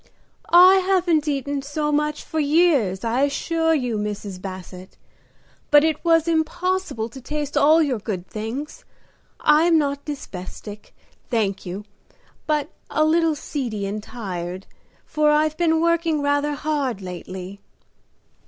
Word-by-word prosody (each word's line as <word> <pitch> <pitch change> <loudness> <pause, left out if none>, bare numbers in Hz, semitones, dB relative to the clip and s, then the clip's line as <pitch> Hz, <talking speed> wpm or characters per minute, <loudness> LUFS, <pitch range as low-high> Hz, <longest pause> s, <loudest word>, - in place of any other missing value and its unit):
"I 365 +2 +8
haven't 365 -5 +2
eaten 285 -1 -1
so 295 +2 -2
much 300 0 0
for 320 - -3
years, 290 - +2
I 235 +3 0
assure 325 +3 +1
you, 245 -6 -1
Mrs. 205 -3 -5
Basset; 185 -1 -9 0.7
but 295 0 +6
it 315 -2 0
was 330 -1 +3
impossible 335 -5 -1
to 265 +3 -11
taste 295 +2 -4
all 305 +3 +5
your 260 -6 -1
good 195 -4 -4
things. 250 - -6 0.6
I 305 +2 +5
am 340 -2 +4
not 285 -2 -1
dyspeptic, 210 - -8 0.3
thank 200 -6 -1
you, 195 +4 -6 0.6
but 300 -2 0 0.2
a 310 - +2
little 325 0 +2
seedy 245 -9 -4
and 205 +2 -4
tired, 185 -5 -6 0.4
for 305 -1 +1
I've 305 +1 +2
been 325 -1 +2
working 335 -3 +1
rather 285 +1 +1
hard 275 -8 -2
lately." 185 +2 -7
285 Hz, 135 wpm, -22 LUFS, 215-315 Hz, 0.7 s, I